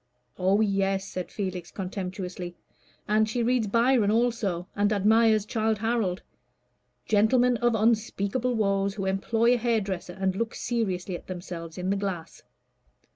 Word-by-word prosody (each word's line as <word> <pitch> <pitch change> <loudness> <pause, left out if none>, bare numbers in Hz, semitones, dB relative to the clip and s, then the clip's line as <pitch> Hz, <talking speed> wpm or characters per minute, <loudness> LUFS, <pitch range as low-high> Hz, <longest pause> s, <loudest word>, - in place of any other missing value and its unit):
"Oh, 190 +3 +3
yes," 195 -2 +1
said 185 -2 -5
Felix, 185 -4 -4
contemptuously. 185 -2 -5 0.5
"And 215 +1 +2
she 235 +2 -1
reads 240 -2 +1
Byron 230 0 +3
also, 215 -6 0
and 205 +1 +2
admires 215 +1 +4
Childe 220 -1 0
Harold 220 -4 -1 0.8
gentlemen 240 +4 +3
of 240 0 +2
unspeakable 225 +2 +1
woes, 200 -2 +1
who 195 -3 -3
employ 225 +5 +2
a - - +2
hairdresser, 210 -7 -1
and 190 0 -1
look 230 +3 -2
seriously 195 -6 -2
at - - -10
themselves 175 -2 -7
in 185 +1 -1
the 200 - +1
glass." 190 -5 -5
205 Hz, 135 wpm, -27 LUFS, 190-225 Hz, 0.8 s, admires